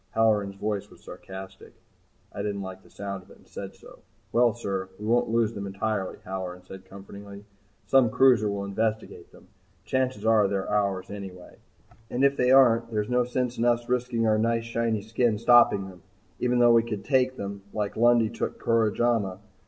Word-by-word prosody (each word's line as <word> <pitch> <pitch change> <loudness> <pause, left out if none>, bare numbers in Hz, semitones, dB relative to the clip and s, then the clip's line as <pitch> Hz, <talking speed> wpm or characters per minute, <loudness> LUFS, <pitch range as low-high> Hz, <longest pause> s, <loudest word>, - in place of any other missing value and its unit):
Halloran's 105 -3 +2
voice 105 0 -3
was - - -19
sarcastic. 95 0 -11 0.6
I - - -5
didn't 100 -1 -3
like 95 0 -8
the - - -21
sound 100 -1 -6
of - - -22
it, - - -16
and - - -24
said - - -8
so. - - -16 0.3
"Well, 120 0 +4
sir 100 -5 -4
we 105 - -8
won't 120 +2 +2
lose 115 -1 +1
them 100 -2 -5
entirely," 100 0 -3
Halloran 90 -1 -6
said 95 0 -11
comfortingly. 100 +1 -11 0.4
"Some 125 +3 +4
cruiser 120 -3 +4
will 100 0 -3
investigate 110 +2 -3
them. - - -19 0.4
Chances 130 -5 -1
are 110 -2 +4
they're 95 -1 -2
ours 100 -2 -1
anyway 95 -3 -9 0.5
and 125 +2 -1
if 140 0 +4
they 125 -2 +1
aren't 120 -3 +5
there's 105 -1 -2
no 125 0 +2
sense 125 0 -2
in 115 - +1
us 120 0 +1
risking 125 -2 0
our 110 -1 +2
nice 115 +1 +1
shiny 115 -2 -2
skin 110 0 0
stopping 115 -4 +4
them 90 -2 -13 0.4
even 125 0 +1
though 120 -1 +6
we 115 - +6
could 110 -3 -6
take 130 -2 +2
them 100 0 -6
like 105 -1 -3
Lundy 120 0 +4
took - - -4
Koromaja. 115 -3 +1
110 Hz, 185 wpm, -26 LUFS, 100-120 Hz, 0.6 s, though